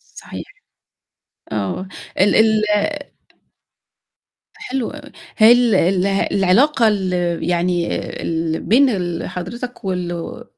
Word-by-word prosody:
صحيح. - - -8 1.1
آه. 110 - -3 0.3
ال 195 +2 +4
ال 220 -1 +4 1.9
حلو 265 - -4
أوي. 295 -1 -11 0.3
هي 220 +2 +7
ال 240 -3 +4
اله 190 +2 +2
العلاقة 225 +7 +3
ال 190 -3 0 0.4
يعني 175 0 0 0.3
اللي 165 -1 -2
بين 265 +5 +4
ال 175 -6 -3
حضرتك 235 +6 -7
والو 175 -2 -4
195 Hz, 95 wpm, -19 LUFS, 175-235 Hz, 1.9 s, هي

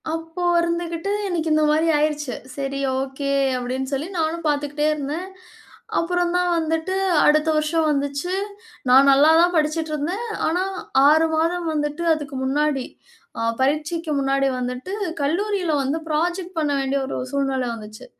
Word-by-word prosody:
அப்போ 325 +2 -6 0.2
இருந்துக்கிட்டு 340 +2 -2 0.2
எனக்கு 330 -2 -1
இந்த 310 0 +3
மாரி 320 +2 +2
ஆயிடுச்சு. 295 -3 -1 0.2
சரி. 275 0 -3 0.2
ஓகே 275 +1 -3 0.3
அப்டின்னு 260 +2 -3
சொல்லி 290 +5 -2
நானும் 325 +1 -1
பார்த்துக்கிட்டே 295 +1 0
இருந்தேன். 300 +5 -4 0.7
அப்புறம் 350 0 0
தான் 360 -1 +1
வந்துட்டு, 325 +3 -1 0.3
அடுத்த 305 +1 +4
வருஷம் 310 +1 +1
வந்துச்சி. 285 +5 -2 0.6
நான் 270 +2 +7
நல்லா 290 +4 +6
தான் 355 +1 +3
படிச்சிட்டு 310 +1 0
இருந்தேன். 350 +11 -2 0.2
ஆனா, 350 +3 +1 0.5
6 315 +2 +5
மாதம் 335 +2 0
வந்துட்டு 295 +2 -2
அதுக்கு 295 -2 -5
முன்னாடி, 275 0 0 0.5
அ - - -3 0.2
பரீட்சைக்கு 305 +3 0
முன்னாடி 275 0 +1
வந்துட்டு 250 +9 -4 0.3
கல்லூரில 360 +2 0
வந்து 275 +4 -1
ப்ராஜெக்ட் 345 +3 -2
பண்ண 295 -2 0
வேண்டிய 270 +1 0
ஒரு - - -4
சூழ்நில 270 -2 0
வந்துச்சி. 215 -1 -10
305 Hz, 140 wpm, -22 LUFS, 275-335 Hz, 0.7 s, நான்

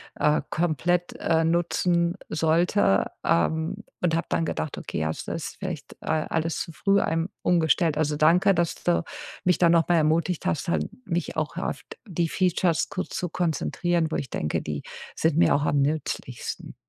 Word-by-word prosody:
äh, 150 0 +2
komplett, 175 +2 0
äh, 165 -1 +2
nutzen 170 +1 +1
sollte, 160 - +2
ähm, 160 - +1 0.2
und 165 -2 +2
habe 165 - -1
dann 165 - +1
gedacht: 155 - -3
„Okay, - - -4
ja, 80 - 0
das 80 - -5
ist - - -5
vielleicht, - - -5
äh, - - -11
alles 160 +1 -1
zu - - -5
früh 195 +5 +2
einem 165 +1 0
umgestellt.“ 165 -2 +2
Also, 150 -1 +1
danke, 170 +6 +4
dass 170 -2 0
du 175 -1 +2 0.4
mich 180 -1 +3
da 175 - +4
noch 170 0 +3
mal 175 - +5
ermutigt 160 +2 +1
hast, 155 - -1
halt - - +1 0.2
mich 175 -4 -2
auch 155 +1 -2
auf 185 - -3 0.3
die 170 -3 -1
Features 180 -2 +1
ku 185 - -3
zu 180 - -4
konzentrieren, 170 0 0
wo - - -3
ich 135 - -3
denke, 75 -7 -2
die 75 -1 -4 0.3
sind 160 -2 +1
mir - - +5
auch 145 - +1
am 145 -1 +2
nützlichsten. 140 -4 -3
165 Hz, 175 wpm, -25 LUFS, 155-175 Hz, 0.4 s, mal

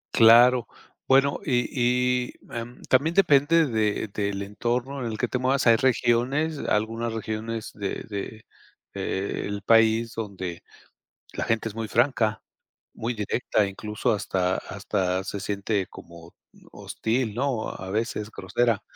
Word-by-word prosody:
Claro, 120 +2 +7 0.4
bueno, 135 +1 +4
y 125 -3 +1 0.6
y, - - -11 0.2
em, 120 +1 -7
también 150 +6 +2
depende 165 -2 +5
de 110 -4 0
del 100 -1 -2
entorno 120 +6 -2
en 115 - -3
el 110 - -5
que 125 - 0
te 125 - -2
muevas. 130 +2 +1
Hay 115 -1 +7
regiones, 130 +5 +1
algunas 115 +2 -1
regiones 110 0 -4
de 100 -1 -4
de, 110 +1 -7 0.5
eh, 95 +1 -3
el 100 0 -5
país 115 +1 +4
donde 95 -6 -5 0.7
la - - -3
gente 115 0 0
es - - -12
muy 115 -1 -4
franca, 115 -4 +1 0.5
muy 115 +2 -2
directa, 105 -1 0
incluso 105 +2 -2
hasta 95 -3 0
hasta 95 -1 -2
se 100 +1 -5
siente 100 0 -1
como, 85 0 -13 0.2
mm, - - -21
hostil, 115 -1 -2
¿no?, 125 -3 -1
a 95 0 -7
veces 110 0 -2
grosera, 115 -4 0
115 Hz, 140 wpm, -25 LUFS, 100-125 Hz, 0.7 s, Claro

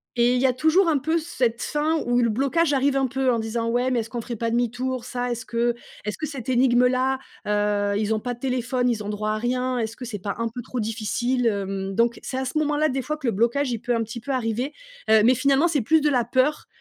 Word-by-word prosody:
Et 240 0 +3
il 250 - +1
y - - +3
a 255 - +2
toujours 320 +8 +3
un 305 - +3
peu 320 +5 0
cette 245 -8 -1
fin 305 +2 0
où 245 0 +3
le 235 - +2
blocage 280 +7 +1
arrive 275 0 +2
un 270 - +2
peu 260 0 +1
en 235 - +1
disant, 230 +1 -2
ouais, 245 +2 +1
mais 245 - +2
est-ce 225 0 -4
qu'on 240 -2 -4
ferait 235 +1 -5
pas 230 +1 -2
demi-tour? 245 +2 -1
Ça, 245 0 -3
est-ce 235 -1 -4
que 235 0 0 0.3
est-ce 210 - -3
que 310 - -3
cette 270 -5 -6
énigme-là, 255 +1 +3 0.3
heu, 205 -1 +1
ils 220 +1 +1
ont - - -1
pas 245 +3 -3
de 240 - -13
téléphone, 250 -1 0
ils 220 -3 -1
ont 205 - -5
droit 210 +1 -2
à 215 - -1
rien, 250 +2 -1
est-ce 225 -1 -2
que 250 - -8
c'est 215 -3 -5
pas 200 +1 -4
un 230 - 0
peu 245 +2 -7
trop 255 - -5
difficile, 230 +3 -1
hem? 195 -2 -2
Donc, 235 +3 +1
c'est 260 - -4
à 265 - -1
ce 260 - -3
moment-là 300 0 +2
des 265 +1 -1
fois 305 +4 -3
que 275 -5 -4
le - - +1
blocage 235 +7 +1
il 235 - -2
peut, 245 - -1
un 230 - 0
petit 225 +2 -7
peu, 275 +4 -5
arriver, 250 +2 -1 0.4
heu, 220 -1 +6
mais 250 +2 +5
finalement 275 +5 +3
c'est 300 -6 +1
plus 315 +8 +3
de 295 - +3
la 250 -4 +2
peur, 260 +5 +1
245 Hz, 270 wpm, -24 LUFS, 225-265 Hz, 0.4 s, heu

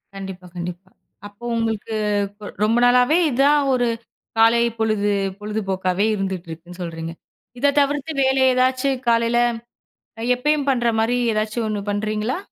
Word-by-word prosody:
கண்டிப்பா, 190 -2 -8
கண்டிப்பா. 180 +2 -6 0.4
அப்ப 205 +3 -20
உங்களுக்கு 225 -1 -2 0.4
கு 210 - -9 0.2
ரொம்ப 225 +2 +3
நாளாவே 250 +6 +4
இதான், 285 +4 +4
ஒரு 245 -1 +2 0.5
காலை 230 +1 +5 0.2
பொழுது 215 -2 +1 0.3
பொழுதுபோக்காவே, 195 -2 -1
இருந்துட்ருக்குன்னு 180 -2 -6
சொல்றீங்க. 165 -1 -5 0.5
இத 285 +1 +3
தவிர்த்து 285 +2 0
வேற 265 0 +3
ஏதாச்சு 255 +2 +2 0.2
காலைல 230 0 +3 0.8
அ - - -4
எப்பயும் 285 +2 0
பண்ற 240 -2 +1
மாரி 245 +2 +1 0.2
ஏதாச்சும் 215 +1 -1
ஒண்ணு 205 -1 -2
பண்றீங்களா? 215 - -1
220 Hz, 125 wpm, -21 LUFS, 195-250 Hz, 0.8 s, காலை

